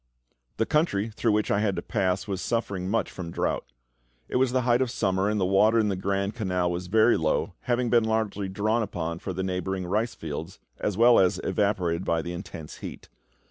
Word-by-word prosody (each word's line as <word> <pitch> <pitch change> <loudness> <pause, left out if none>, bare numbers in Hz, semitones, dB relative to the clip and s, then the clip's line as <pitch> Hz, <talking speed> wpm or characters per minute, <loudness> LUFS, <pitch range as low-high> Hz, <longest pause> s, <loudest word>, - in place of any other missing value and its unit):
The 115 - +2
country 115 -9 +1
through 110 0 0
which 105 0 +1
I 100 - +3
had 105 -3 +1
to 85 - -4
pass 95 +2 0
was 95 -2 -3
suffering 100 -6 -2
much 115 +3 0
from 90 -3 -6
drought; 85 - -2 0.6
it - - -1
was 130 -1 +2
the 130 0 +2
height 120 +1 +3
of 130 - +1
summer; 95 -4 0
and 105 0 0
the 95 - +2
water 105 +4 +4
in 110 -2 +3
the 95 - 0
Grand 100 +2 -1
Canal 90 -6 0
was 90 +1 -4
very 110 +5 +4
low, 80 -1 0
having 120 -1 +1
been 120 -2 +4
largely 110 -3 -1
drawn 110 +4 0
upon 85 -5 -3
for 95 - -5
the 95 +1 -3
neighbouring 95 0 -2
rice 110 +6 -1
fields, 80 +4 -6 0.2
as 100 -2 -1
well 120 +1 +6
as 90 -2 +3
evaporated 95 -4 0
by 85 -2 0
the 85 - -5
intense 85 -3 -8
heat. - - -9
100 Hz, 210 wpm, -26 LUFS, 90-110 Hz, 0.6 s, well